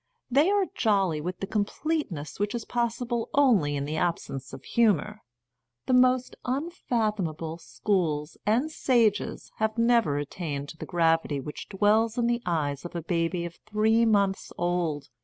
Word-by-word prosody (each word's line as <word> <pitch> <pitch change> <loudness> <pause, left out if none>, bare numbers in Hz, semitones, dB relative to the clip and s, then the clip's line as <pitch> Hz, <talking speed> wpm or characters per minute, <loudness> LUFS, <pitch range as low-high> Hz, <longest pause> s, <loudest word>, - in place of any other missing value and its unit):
They 290 +8 +4
are 405 -1 +3
jolly 195 - +1
with 180 +4 -5
the - - -1
com 210 +1 +1
pleteness 205 - -3
which 205 +3 -1
is 235 - -4
possible 235 0 -1
only 220 - +4
in 140 0 -2
the 155 +2 -3
ab 170 0 +1
sence 135 -1 -8
of - - -9
humour. 210 -2 +1 0.6
The 255 - +1
most 255 0 +3
unfathomable 215 - -2
schools 150 +3 -1
and 245 +9 +1
sages 230 -8 +1
have 220 +1 0
never 230 -10 +3
attained 145 -1 -4
to 160 - -10
the - - -7
gravity 165 -4 +2
which 150 +3 -7
dwells 215 +3 +2
in 240 - +2
the 235 0 +1
eyes 145 -5 -1
of 175 - -8
a 170 - -3
baby 170 +1 -1
of 170 0 -8
three 220 +2 +3
months 200 -3 +1
old. 175 -4 -1
200 Hz, 160 wpm, -27 LUFS, 160-235 Hz, 0.6 s, They